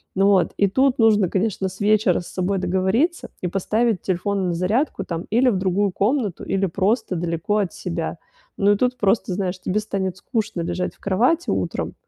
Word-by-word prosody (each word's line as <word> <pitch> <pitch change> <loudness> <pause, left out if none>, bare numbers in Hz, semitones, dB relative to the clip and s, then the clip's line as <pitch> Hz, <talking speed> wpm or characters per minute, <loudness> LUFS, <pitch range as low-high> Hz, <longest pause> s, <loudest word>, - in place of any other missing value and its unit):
Ну 195 +1 +3
вот, 195 -3 +3
и 200 - +4
тут 260 +4 +2
нужно, 210 -5 +4
конечно, 190 0 -1
с 190 - -13
вечера 210 -3 +3
с 175 - -11
собой 190 +2 -1
договориться 190 - 0
и 180 - -1
поставить 215 +3 0
телефон 190 +1 -1
на - - 0
зарядку, 195 - 0
там, 170 -2 -4
или 245 +4 +3
в 200 - +1
другую 190 +2 +1
комнату, 210 - -1
или 195 0 0
просто 195 +3 0
далеко 170 +4 -1
от 200 -4 0
себя. - - -4 0.4
Ну 200 +1 +4
и - - 0
тут 250 +3 0
просто, 200 -2 +1
знаешь, 185 -1 -2
тебе 185 +3 -1
станет 195 -3 -3
скучно 210 -4 -3
лежать 175 +2 -2
в - - -32
кровати 245 - +1
утром, - - -2
195 Hz, 190 wpm, -22 LUFS, 185-215 Hz, 0.4 s, и